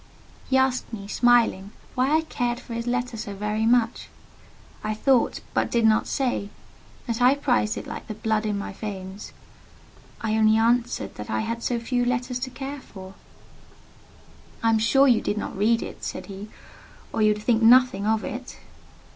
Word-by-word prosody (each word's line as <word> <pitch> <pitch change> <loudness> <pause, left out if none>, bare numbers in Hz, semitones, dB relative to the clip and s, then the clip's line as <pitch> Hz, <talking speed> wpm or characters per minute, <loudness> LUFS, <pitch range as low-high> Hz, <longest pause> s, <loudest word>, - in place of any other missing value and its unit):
He 265 - +3
asked 260 -2 +1
me, 200 -3 -7
smiling, 230 -3 +2 0.2
why 255 +2 +1
I - - +1
cared 245 -6 -2
for 235 - -9
his 230 +1 -4
letter 245 0 -1
so 205 -2 -6
very 210 +2 -1
much. 235 -1 +1 0.7
I 215 0 -2
thought, 255 +2 +2
but - - +1
did 235 -1 +2
not 220 0 +3
say, 245 -6 -1 0.6
that 230 -1 -3
I 255 +3 +6
prized 245 -6 +1
it - - -6
like - - -7
the 215 - -5
blood 220 0 -1
in 205 -1 -1
my 200 - -5
veins. 195 -1 -7 0.9
I 220 -1 -1
only 220 0 +4
answered 235 +2 +1
that 105 - -7
I 110 0 0
had 230 0 -3
so 240 0 -1
few 245 +1 -1
letters 245 +1 -1
to 260 +1 -4
care 270 +2 -6
for. 190 -4 -11 1.5
"I 225 - +4
am 220 - +3
sure 270 +5 +4
you 240 -4 +4
did 205 - -2
not - - -4
read 225 +4 +2
it," - - -9
said - - -5
he; 200 +1 -9 0.6
"or 225 - -1
you 215 0 +5
would 210 - -9
think 230 0 +2
nothing 230 -3 +5
of 220 0 +1
it!" 250 +2 -6
230 Hz, 180 wpm, -25 LUFS, 215-245 Hz, 1.5 s, I